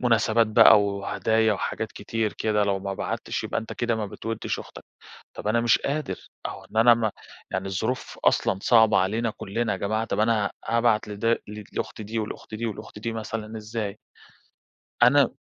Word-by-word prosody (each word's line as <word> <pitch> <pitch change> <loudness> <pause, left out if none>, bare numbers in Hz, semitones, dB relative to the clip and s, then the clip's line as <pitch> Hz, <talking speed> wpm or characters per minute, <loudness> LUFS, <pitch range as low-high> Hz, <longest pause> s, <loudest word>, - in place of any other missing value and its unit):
مناسبات 115 -1 +3
بقى 105 -1 +7
وهدايا 105 +2 +1
وحاجات 100 - -3
كتير 115 -2 -2
كده، 105 -1 +1
لو 100 -1 0
ما 100 0 -4
بعَتتش - - -3
يبقى - - -1
أنت 110 - -8
كده 120 -1 -1
ما 105 -2 -2
بتودّش 115 +2 -4
أختك. - - -10 0.5
طَب - - -4
أنا 115 +2 +3
مش 120 0 +4
قادر، 140 -10 -3 0.2
أو - - -8
إن - - -13
أنا 115 +1 +7
ما 110 -3 -1 0.4
يعني 95 +1 -2
الظروف 110 +7 -3
أصلًا 95 - +3
صعبًة 110 -3 +5
علينا 110 +5 +1
كلّنا 110 +3 -2
يا 95 - -3
جماعة. 110 +2 -1
طَب 105 -2 -2
أنا 110 -2 +2 0.2
هابعت 115 -2 +2
لد 115 +3 +1 0.3
لأختي 110 - -4
دي 110 +2 -4
ولأختي 110 0 -5
دي 115 - -3
ولأختي 105 -1 -7
دي 115 +1 -3
مثلًا 110 0 -5
إزاي! 110 -1 -4 1.1
أنا 135 +1 +6
110 Hz, 170 wpm, -25 LUFS, 105-115 Hz, 1.1 s, بقى